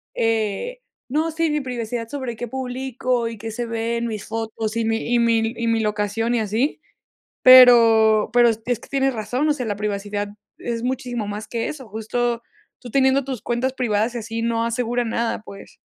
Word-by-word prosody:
eh, 225 Hz, -, -1 dB, 0.3 s
no, 310 Hz, +4 st, 0 dB
sí, 325 Hz, 0 st, 0 dB
mi 300 Hz, -1 st, 0 dB
privacidad 240 Hz, -2 st, -4 dB
sobre 255 Hz, -3 st, -5 dB
qué 240 Hz, -, -5 dB
publico 255 Hz, -1 st, -2 dB
y 230 Hz, -1 st, -6 dB
qué 225 Hz, +2 st, -6 dB
se 240 Hz, +2 st, -3 dB
ve 230 Hz, 0 st, -2 dB
en 235 Hz, 0 st, -2 dB
mis 215 Hz, -3 st, -5 dB
fotos 225 Hz, 0 st, -4 dB
y 230 Hz, -, 0 dB
mi 225 Hz, +2 st, -1 dB
y 240 Hz, -, +4 dB
mi 230 Hz, -1 st, +2 dB
y 230 Hz, 0 st, -2 dB
mi 225 Hz, 0 st, +2 dB
locación 210 Hz, +2 st, -1 dB
y -, -, +2 dB
así. 220 Hz, +9 st, -1 dB, 0.6 s
Pero 230 Hz, -4 st, +7 dB
pero 240 Hz, -1 st, +6 dB
es 225 Hz, 0 st, -2 dB
es 245 Hz, -2 st, 0 dB
que -, -, -15 dB
tienes 270 Hz, -1 st, +1 dB
razón, 245 Hz, +7 st, -1 dB
o -, -, +4 dB
sea, 250 Hz, -4 st, -4 dB
la 205 Hz, -, -2 dB
privacidad 205 Hz, 0 st, -3 dB, 0.3 s
es 235 Hz, 0 st, -4 dB
muchísimo 245 Hz, -4 st, -3 dB
más 210 Hz, +1 st, -5 dB
que 230 Hz, -1 st, -2 dB
eso. 265 Hz, -6 st, -7 dB
Justo, 235 Hz, +2 st, -2 dB, 0.4 s
tú 245 Hz, -, -10 dB
teniendo 270 Hz, +1 st, +3 dB
tus 260 Hz, -4 st, -5 dB
cuentas 250 Hz, +2 st, -1 dB
privadas 230 Hz, -2 st, 0 dB
y -, -, -2 dB
así 225 Hz, +1 st, -5 dB
no 230 Hz, 0 st, 0 dB
asegura 240 Hz, +1 st, -1 dB
nada, 230 Hz, 0 st, -1 dB
pues. 200 Hz, -2 st, -12 dB
230 Hz, 195 wpm, -22 LUFS, 220-250 Hz, 0.6 s, Pero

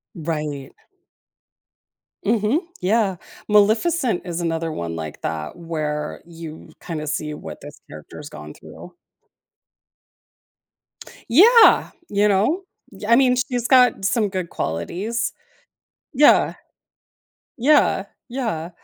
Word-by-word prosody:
Right. 150 Hz, -4 st, -4 dB, 1.5 s
Mhm. 220 Hz, +7 st, +1 dB, 0.2 s
Yeah. 195 Hz, 0 st, +1 dB, 0.3 s
Maleficent 220 Hz, -, +2 dB
is 175 Hz, -1 st, -4 dB
another 165 Hz, -1 st, -2 dB
one 85 Hz, -, -5 dB
like 80 Hz, -2 st, -7 dB
that 80 Hz, -1 st, -4 dB
where 155 Hz, -3 st, -4 dB
you 165 Hz, -2 st, -10 dB
kinda 155 Hz, -3 st, -5 dB
see 150 Hz, 0 st, -3 dB
what 80 Hz, -, -9 dB
this -, -, -11 dB
character 75 Hz, 0 st, -11 dB
has 145 Hz, -1 st, -9 dB
gone 75 Hz, 0 st, -10 dB
through. -, -, -13 dB, 2.3 s
Yeah, 445 Hz, -, +6 dB, 0.2 s
you 205 Hz, +1 st, +2 dB
know? 215 Hz, -, +1 dB, 0.4 s
I 235 Hz, -, +6 dB
mean, 255 Hz, 0 st, +4 dB
she's 245 Hz, -2 st, -1 dB
got 250 Hz, -6 st, +4 dB
some 210 Hz, 0 st, +1 dB
good 185 Hz, -3 st, -4 dB
qualities. 180 Hz, -, -3 dB, 0.8 s
Yeah. 295 Hz, +2 st, +5 dB, 1.0 s
Yeah. 290 Hz, +5 st, +3 dB, 0.2 s
Yeah. 225 Hz, -11 st, -3 dB
190 Hz, 100 wpm, -21 LUFS, 155-235 Hz, 2.3 s, Yeah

